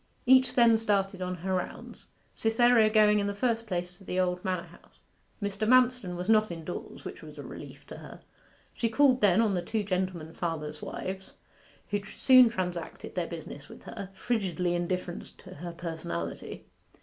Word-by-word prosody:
Each 260 +1 +5
then 230 -2 +6
started 195 -3 0
on 180 0 -2
her 190 - 0
rounds: 180 -1 -5 0.3
Cytherea 225 0 +4
going 210 -1 +5
in 200 - 0
the 200 - -3
first 230 +1 0
place 180 -2 -3
to - - -15
the 185 0 -2
old 180 -1 0
manor 185 -3 -1
house. 175 - -20 0.4
Mr. 205 0 -2
Manston 250 -6 +4
was 180 +1 -5
not 215 -1 +4
indoors, 170 +1 -7
which - - -7
was - - -11
a - - -7
relief - - -10
to - - -9
her. - - -11 0.5
She 230 - 0
called 255 +1 +4
then 200 0 +5
on 215 -3 +2
the 180 - 0
two 215 +4 -2
gentleman 185 -4 -2
farmers' 155 -3 -4
wives, 190 0 -6 0.6
who 205 0 0
soon 255 +3 +6
transacted 180 -6 -4
their 175 -2 -2
business 150 -3 -8
with - - -12
her, 200 -4 -7
frigidly 185 -7 -1
indifferent 175 0 -3
to - - -12
her 175 +3 -6
personality. 160 - -5
190 Hz, 175 wpm, -29 LUFS, 175-225 Hz, 0.6 s, then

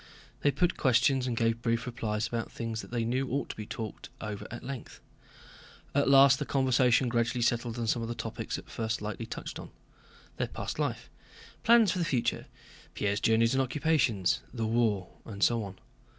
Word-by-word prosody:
They 145 - +3
put 175 +6 +1
questions 130 0 +3
and 120 -2 -2
gave 115 0 +1
brief 115 0 0
replies 115 -3 -2
about 115 -2 -3
things 115 -1 -4
they 115 -1 -3
knew 130 +3 -1
ought 140 +2 -2
to - - -5
be 105 -1 -7
talked 110 -3 -6
over 105 -2 -5
at 120 - -8
length. 135 -2 -7 0.9
At 140 0 +2
last 135 0 +7
the - - 0
conversation 130 -2 +3
gradually 120 0 0
settled 120 0 0
on 120 - -1
some 115 +1 +1
of 115 - -3
the 120 - -4
topics 115 0 -4
at - - -10
first 115 0 -2
lightly 110 +2 -4
touched - - -6
on: - - -9 0.7
their - - 0
past - - -5
life, - - -2 0.5
plans 230 -4 +6
for 185 - -2
the 170 - +1
future, 125 -6 0 0.5
Pierre's 100 0 0
journeys 115 +2 +3
and 135 - +3
occupations, 130 - +1
the 115 -3 -2
war, 110 -5 +1 0.2
and 100 -3 -4
so 115 -2 +3
on. 95 -2 -8
120 Hz, 185 wpm, -30 LUFS, 115-130 Hz, 0.9 s, last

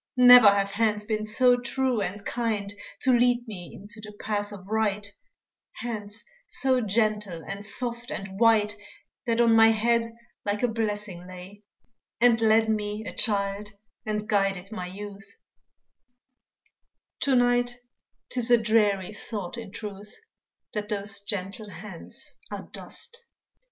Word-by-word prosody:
Never 250 -3 +10
have 200 0 +1
hands 210 0 +1
been 215 -1 -2
so 245 +3 +5
true 255 -1 0
and 200 +2 -4
kind, 215 -4 -2 0.3
To 260 - +4
lead 245 0 +3
me 180 -5 -7
into 210 +2 -9
the 210 0 -9
path 205 -1 -2
of 190 -2 -10
right 210 -1 0 0.7
Hands 215 -2 -5 0.2
so 260 -1 +1
gentle, 210 -5 0
and 200 +1 -5
soft, 235 +3 -1
and 195 0 -6
white, 220 -3 +4 0.5
That 230 0 +1
on 230 -1 +5
my 225 0 +8
head 230 +1 +2 0.3
like 205 +3 -2
a - - +5
blessing 210 -5 -3
lay, 185 +3 -11 0.6
And 235 -1 +4
led 220 0 +4
me 210 0 -2
a - - -5
child 205 -1 0 0.3
and 210 0 -3
guided 195 -2 0
my 185 -5 -5
youth; 200 +2 -9 1.8
To 275 -2 +3
night 245 0 +2 0.5
'tis 245 -1 0
a 240 - +7
dreary 215 -3 +2
thought, 205 -2 -6
in 225 -4 -8
truth, 205 0 -8 0.6
That 210 -1 -3
those 200 -1 0
gentle 200 +1 -5
hands 190 -3 -8
are - - -6
dust. 470 +1 -6
215 Hz, 135 wpm, -26 LUFS, 200-230 Hz, 1.8 s, Never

